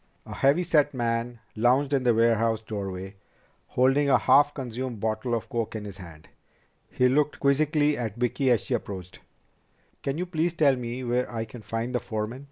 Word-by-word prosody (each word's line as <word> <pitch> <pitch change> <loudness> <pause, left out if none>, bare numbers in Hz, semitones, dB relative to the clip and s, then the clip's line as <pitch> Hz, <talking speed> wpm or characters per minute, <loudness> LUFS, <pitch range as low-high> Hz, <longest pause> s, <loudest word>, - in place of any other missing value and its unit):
A - - -8
heavy 140 +6 +3
set 150 -4 +2
man 120 0 -2 0.2
lounged 130 +5 +2
in 135 - +3
the 125 -2 +3
warehouse 115 -1 +2
doorway, 95 -2 -6 0.5
holding 135 +3 +2
a - - +6
half 145 +1 +5
consumed 125 -3 -5
bottle 110 +3 -1
of 115 0 -4
coke 115 -1 -3
in 105 -1 -5
his 100 -2 -8
hand. 85 -5 -12 0.6
He 125 - +2
looked 145 +3 +1
quizzically 150 +1 +2
at 110 -4 -3
Vicki 125 +2 0
as 120 -3 +3
she - - -4
approached. 95 -5 -5 0.8
"Can 140 +1 -2
you 180 - -2
please 170 -1 -1
tell 145 -5 +3
me 125 +1 -5
where 125 +1 -1
I 115 -1 -3
can 115 +1 -11
find 115 +3 -4
the 125 - +1
foreman?" 110 +2 -4
120 Hz, 180 wpm, -26 LUFS, 110-140 Hz, 0.8 s, a